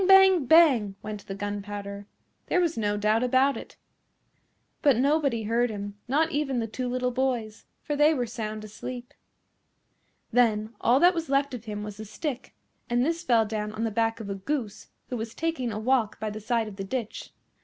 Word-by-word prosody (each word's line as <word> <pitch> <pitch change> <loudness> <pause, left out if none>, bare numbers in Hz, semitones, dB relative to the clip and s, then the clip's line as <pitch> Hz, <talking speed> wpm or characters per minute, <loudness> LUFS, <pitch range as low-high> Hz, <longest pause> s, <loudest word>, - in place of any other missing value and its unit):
Bang! 385 -5 +7
Bang! 265 -12 +5
went 210 -1 -7
the 195 - -5
gunpowder. 205 0 -5 0.4
There - - +2
was 335 -2 +1
no 205 -2 0
doubt 215 +2 +2
about 260 +2 +3
it. - - -9 1.0
But 280 -6 +4
nobody 275 -3 +2
heard 235 +3 +1
him, 205 -1 -5
not 310 +5 +2
even 280 -3 -1
the 230 - 0
two 250 +3 -4
little 250 0 0
boys, 240 -4 -2 0.2
for 295 - -2
they 295 +2 +5
were 255 -6 0
sound 215 -2 -5
asleep. 245 +4 -8 1.2
Then 220 -2 +2
all 245 +3 +4
that 355 +3 +6
was 330 -4 -3
left 275 0 +1
of 235 -2 -7
him 210 -1 -5
was 210 -1 -7
the 215 - -7
stick, 255 +5 -5 0.3
and 240 +1 +2
this 330 +2 -1
fell 235 -9 +3
down 210 -1 -3
on 220 +1 -3
the 225 - 0
back 225 +1 0
of 220 - -6
a 200 - -2
Goose 215 +2 -4 0.2
who 250 - -3
was 225 0 -5
taking 320 -8 -2
a 210 - -4
walk 225 -1 +1
by 215 -1 -3
the 215 +1 -7
side 230 0 0
of 200 -2 -9
the 195 - -4
ditch. 230 +2 -4
235 Hz, 195 wpm, -27 LUFS, 215-270 Hz, 1.2 s, Bang